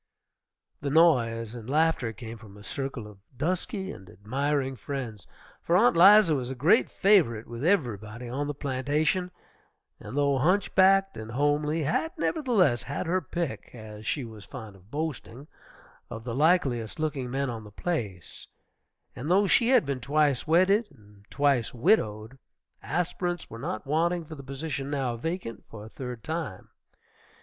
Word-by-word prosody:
The 140 - -2
noise 120 -8 +3
and 120 -1 -9
laughter 155 -5 +2
came 115 0 -9
from 105 -2 -14
a 105 - -13
circle 135 +2 -4
of 105 -2 -13 0.2
dusky 185 - -2
and 95 0 -12
admiring 135 +6 -2
friends, 120 - -6 0.3
for 170 - +2
Aunt 235 +2 +4
'Liza 195 0 +7
was 130 -4 -2
a 130 - -4
great 160 - +4
favorite 160 - +3
with 120 +2 -7
everybody 120 - 0
on 140 +4 -3
the 145 - -3
plantation, 145 +7 0 0.7
and 110 +6 -7
though 140 -2 +2
hunchbacked 195 +3 +3
and 110 0 -7
homely, 150 +3 +1
had, 245 - 0
nevertheless, 230 - +2
had 140 +7 -4
her 185 +2 +1
pick, 170 0 -4
as 110 -1 -10
she 140 -5 -1
was 110 -3 -11
fond 110 -6 -10
of 95 +1 -20
boasting, 145 -2 -5 0.6
of 115 - -7
the 120 -1 -4
likeliest 135 -6 +1
looking 145 -5 -2
men 135 0 -1
on 115 -2 -6
the 105 - -11
place; 105 - -4 0.7
and 130 +5 -5
though 195 +3 +4
she 230 +4 +3
had 255 - +5
been 140 -2 -2
twice 145 +1 +1
wedded 190 +7 +4
and 105 -6 -20
twice 140 -5 +1
widowed, 120 - +1 0.4
aspirants 175 -1 -2
were 115 - -8
not 110 - -4
wanting 165 +4 0
for 155 - -9
the 145 - -9
position 140 +1 -5
now 135 -4 -1
vacant 165 - -5
for 105 -1 -9
a - - -11
third 125 -2 -7
time. 160 - -5
140 Hz, 160 wpm, -27 LUFS, 115-165 Hz, 0.7 s, Liza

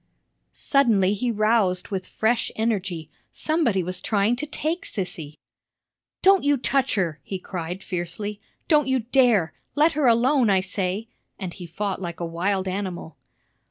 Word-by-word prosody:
Suddenly 220 -9 +3
he 240 +4 -1
roused 215 -4 +1
with 190 -2 -3
fresh 225 +1 0
energy. 190 -8 -2 0.2
Somebody 280 - +1
was 180 +1 -4
trying 215 +1 +2
to 300 +4 -3
take 315 +4 -2
Sissy. 160 -6 -5 0.9
"Don't 390 0 +6
you 285 0 +3
touch 270 0 +1
her!" 170 -6 -1
he 190 - -5
cried, 180 0 -6
fiercely. 195 +4 -4 0.3
"Don't 300 -4 +4
you 265 0 +2
dare! 235 -7 +3 0.2
Let 305 +3 +4
her 295 -3 +1
alone, 240 +1 +4
I 195 -1 +4
say!" 190 +3 -3 0.3
and 185 -3 -5
he 175 -2 -9
fought 190 +3 -3
like 170 -2 -5
a 170 - -2
wild 185 +3 -1
animal. 185 -4 -4
205 Hz, 150 wpm, -24 LUFS, 180-245 Hz, 0.9 s, Don't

